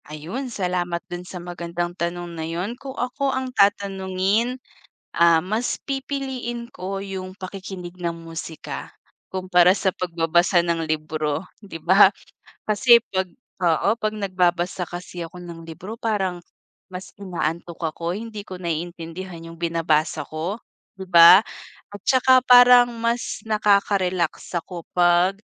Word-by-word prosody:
Ayun, 170 Hz, -, -5 dB
salamat 180 Hz, -5 st, -2 dB
do'n 175 Hz, -, -4 dB
sa 185 Hz, -, -7 dB
magandang 175 Hz, 0 st, -4 dB
tanong 175 Hz, 0 st, -4 dB
na 165 Hz, -, -6 dB
'yon. 180 Hz, +7 st, -3 dB
Kung 265 Hz, +1 st, -9 dB
ako 255 Hz, +3 st, -1 dB
ang 260 Hz, -1 st, -3 dB
tatanungin, 200 Hz, +2 st, +1 dB, 0.6 s
ah, 170 Hz, -1 st, +5 dB
mas 215 Hz, +7 st, -2 dB
pipiliin 265 Hz, -3 st, -4 dB
ko 195 Hz, -3 st, -5 dB
yung 190 Hz, -1 st, -6 dB
pakikinig 185 Hz, -2 st, -8 dB
ng 175 Hz, -2 st, -2 dB, 0.2 s
musika 165 Hz, -1 st, -7 dB, 0.4 s
kumpara 185 Hz, -1 st, +4 dB
sa 195 Hz, 0 st, +1 dB
pagbabasa 175 Hz, +1 st, +2 dB
ng 170 Hz, -1 st, -1 dB
libro, 155 Hz, -1 st, -2 dB, 0.2 s
'di 165 Hz, -5 st, -8 dB
ba? 190 Hz, +4 st, +6 dB, 0.6 s
Kasi 235 Hz, +3 st, +6 dB
'pag 190 Hz, -1 st, -1 dB, 0.3 s
oo 170 Hz, +2 st, +3 dB
'pag 215 Hz, -2 st, -2 dB
nagbabasa 185 Hz, -3 st, 0 dB
kasi 175 Hz, 0 st, -7 dB
ako 170 Hz, +2 st, -10 dB
ng 170 Hz, -2 st, -9 dB
libro 170 Hz, +6 st, -8 dB
parang 195 Hz, -6 st, -2 dB, 0.5 s
mas 185 Hz, +1 st, -7 dB
inaantok 170 Hz, -3 st, -4 dB, 0.2 s
ako, 170 Hz, 0 st, -3 dB
hindi 215 Hz, 0 st, -6 dB
ko 185 Hz, -2 st, -9 dB
naiintindihan 170 Hz, +1 st, -5 dB
yung 165 Hz, -, -10 dB
binabasa 165 Hz, -2 st, 0 dB
ko, 170 Hz, +8 st, -4 dB, 0.4 s
'di 190 Hz, -, -7 dB
ba? 170 Hz, +1 st, +9 dB, 0.5 s
At 205 Hz, -, -9 dB
saka 260 Hz, -1 st, +4 dB
parang 245 Hz, -1 st, +8 dB
mas 235 Hz, +1 st, -1 dB
nakaka-relax 200 Hz, -6 st, +1 dB
ako 170 Hz, +1 st, -6 dB, 0.2 s
'pag, 175 Hz, +2 st, +4 dB
185 Hz, 130 wpm, -23 LUFS, 170-210 Hz, 0.6 s, ba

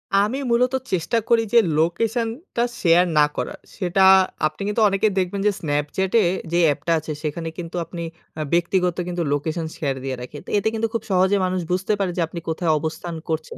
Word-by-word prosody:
আমি 210 Hz, +7 st, +2 dB
মূলত 250 Hz, +2 st, +3 dB, 0.2 s
চেষ্টা 185 Hz, +6 st, 0 dB
করি 230 Hz, -1 st, +4 dB
যে 235 Hz, -, +8 dB, 0.2 s
লোকেশনটা 230 Hz, -, -1 dB, 0.2 s
শেয়ার 175 Hz, 0 st, +5 dB
না 150 Hz, -, +7 dB
করার। -, -, -4 dB, 0.2 s
সেটা 190 Hz, 0 st, 0 dB, 0.5 s
আপনি 155 Hz, +3 st, -10 dB
কিন্তু 210 Hz, +2 st, 0 dB
অনেকে 195 Hz, +2 st, +2 dB
দেখবেন 190 Hz, +2 st, -1 dB
যে 210 Hz, -, +4 dB
Snapchat 150 Hz, +4 st, -1 dB
এ -, -, +2 dB, 0.3 s
যে 175 Hz, -, +2 dB
অ্যাপটা 150 Hz, +3 st, 0 dB
আছে 155 Hz, -, -7 dB
সেখানে 165 Hz, +2 st, -3 dB
কিন্তু 170 Hz, -1 st, -6 dB
আপনি 170 Hz, +1 st, -6 dB, 0.4 s
আ -, -, -1 dB
ব্যক্তিগত 180 Hz, 0 st, +1 dB
কিন্তু 175 Hz, -1 st, -2 dB
লোকেশন 160 Hz, +3 st, -2 dB
শেয়ার 140 Hz, -3 st, -1 dB
দিয়ে 135 Hz, -1 st, -2 dB
রাখি। 125 Hz, +4 st, -8 dB
তো -, -, -11 dB
এতে 205 Hz, +2 st, 0 dB
কিন্তু 225 Hz, 0 st, 0 dB
খুব 230 Hz, -, -2 dB
সহজে 190 Hz, +2 st, +3 dB
মানুষ 185 Hz, 0 st, -1 dB
বুঝতে 190 Hz, +3 st, +1 dB
পারে 190 Hz, -2 st, 0 dB
যে -, -, +1 dB
আপনি 170 Hz, +1 st, -6 dB
কোথায় 160 Hz, 0 st, 0 dB
অবস্থান 165 Hz, +2 st, -4 dB
করছেন 160 Hz, -1 st, -3 dB
180 Hz, 190 wpm, -22 LUFS, 160-205 Hz, 0.5 s, যে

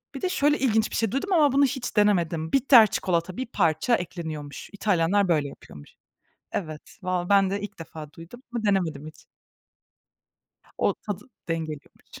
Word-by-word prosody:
Bir -, -, -6 dB
de, 370 Hz, -, 0 dB
şöyle 295 Hz, -3 st, +2 dB
ilginç 220 Hz, -4 st, +2 dB
bir -, -, -4 dB
şey 225 Hz, -3 st, 0 dB
duydum, 370 Hz, +9 st, -1 dB
ama 295 Hz, -5 st, +5 dB
bunu 280 Hz, +1 st, +4 dB
hiç 260 Hz, -4 st, -4 dB
denemedim. 170 Hz, -6 st, +2 dB
Bitter 255 Hz, -5 st, +7 dB
çikolata, 175 Hz, -1 st, -1 dB
bir 260 Hz, -, -2 dB
parça 170 Hz, +3 st, +2 dB
ekleniyormuş. 160 Hz, -5 st, -6 dB
İtalyanlar 195 Hz, -1 st, +2 dB
böyle 150 Hz, -4 st, +1 dB
yapıyormuş. 75 Hz, -, -13 dB, 0.6 s
Evet, 155 Hz, -5 st, -6 dB
vallahi 180 Hz, 0 st, -2 dB
ben 195 Hz, -1 st, +5 dB
de 200 Hz, +1 st, -2 dB
ilk 205 Hz, -, -8 dB
defa 155 Hz, -2 st, -9 dB
duydum 170 Hz, +10 st, -12 dB
ama 230 Hz, -2 st, -2 dB
denemedim 165 Hz, -7 st, 0 dB
hiç. 155 Hz, -, -10 dB, 1.6 s
O, -, -, +2 dB
tadı 205 Hz, -2 st, -6 dB, 0.2 s
dengeliyormuş. 155 Hz, -3 st, -6 dB
190 Hz, 155 wpm, -25 LUFS, 160-230 Hz, 1.6 s, Bitter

